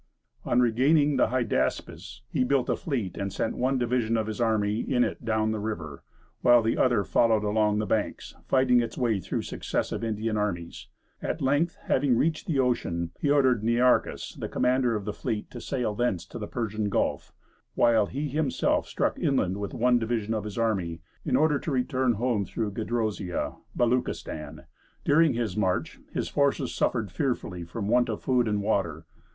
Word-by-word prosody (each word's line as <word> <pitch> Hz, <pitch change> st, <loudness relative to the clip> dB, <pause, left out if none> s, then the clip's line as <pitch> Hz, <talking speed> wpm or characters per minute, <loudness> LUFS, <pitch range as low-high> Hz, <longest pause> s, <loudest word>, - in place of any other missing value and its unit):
On 120 Hz, -, +2 dB
regaining 140 Hz, +5 st, +3 dB
the -, -, +4 dB
Hydaspes, 120 Hz, -1 st, -2 dB
he -, -, 0 dB
built 130 Hz, 0 st, +1 dB
a -, -, +2 dB
fleet, 125 Hz, -, -3 dB
and 100 Hz, -1 st, -3 dB
sent 105 Hz, +3 st, -2 dB
one 130 Hz, +2 st, +1 dB
division 120 Hz, -2 st, +1 dB
of 110 Hz, -, 0 dB
his 110 Hz, +2 st, -4 dB
army 110 Hz, -2 st, +1 dB
in 125 Hz, -1 st, +1 dB
it -, -, -3 dB
down 110 Hz, -1 st, +1 dB
the 110 Hz, -, -2 dB
river, 80 Hz, -10 st, -5 dB, 0.4 s
while 120 Hz, -1 st, +6 dB
the 110 Hz, -, +1 dB
other 120 Hz, -5 st, +3 dB
followed 110 Hz, +1 st, +2 dB
along 105 Hz, 0 st, +2 dB
the 105 Hz, -, 0 dB
banks, 105 Hz, +1 st, -2 dB
fighting 130 Hz, -2 st, +4 dB
its 115 Hz, -, -5 dB
way 115 Hz, -5 st, +1 dB
through 90 Hz, -, -3 dB
successive -, -, -3 dB
Indian 110 Hz, 0 st, -1 dB
armies. 85 Hz, -5 st, -3 dB, 0.3 s
At -, -, -2 dB
length, 145 Hz, +5 st, +1 dB
having 130 Hz, -3 st, +2 dB
reached 155 Hz, +3 st, 0 dB
the 155 Hz, -, 0 dB
ocean, 85 Hz, -10 st, 0 dB
he 145 Hz, -, 0 dB
ordered 130 Hz, -6 st, +4 dB
Nearchus, 120 Hz, +2 st, +1 dB
the -, -, -4 dB
commander 125 Hz, -2 st, +2 dB
of 105 Hz, -2 st, -4 dB
the 105 Hz, -, -3 dB
fleet, 105 Hz, -1 st, -4 dB
to 120 Hz, -, -8 dB
sail 125 Hz, -5 st, -2 dB
thence 105 Hz, -6 st, -1 dB
to 120 Hz, -, -7 dB
the 105 Hz, -, -5 dB
Persian 110 Hz, -3 st, -2 dB
Gulf, -, -, -1 dB, 0.4 s
while 115 Hz, -3 st, +4 dB
he 145 Hz, +4 st, -3 dB
himself 145 Hz, -1 st, 0 dB
struck -, -, -1 dB
inland 100 Hz, -9 st, +1 dB
with 100 Hz, -1 st, -5 dB
one 120 Hz, +1 st, +3 dB
division 115 Hz, -1 st, -1 dB
of 110 Hz, -2 st, -2 dB
his 105 Hz, 0 st, -6 dB
army, 95 Hz, -8 st, -1 dB, 0.2 s
in 125 Hz, -, 0 dB
order 150 Hz, +1 st, +3 dB
to -, -, -5 dB
return 130 Hz, -1 st, +1 dB
home 115 Hz, -1 st, 0 dB
through 105 Hz, +1 st, -3 dB
Gedrosia 110 Hz, -4 st, -2 dB, 0.2 s
(Beluchistan). 80 Hz, -, -1 dB, 0.4 s
During 155 Hz, 0 st, +4 dB
this 115 Hz, -5 st, -2 dB
march 95 Hz, -4 st, -1 dB
his -, -, -2 dB
forces 140 Hz, -2 st, +1 dB
suffered 110 Hz, -6 st, 0 dB
fearfully 90 Hz, -, -2 dB
from 100 Hz, +5 st, -5 dB
want 120 Hz, +2 st, +3 dB
of 110 Hz, -, -4 dB
food 125 Hz, -3 st, +2 dB
and 105 Hz, -1 st, 0 dB
water. 85 Hz, -6 st, -1 dB
115 Hz, 180 wpm, -27 LUFS, 105-125 Hz, 0.4 s, while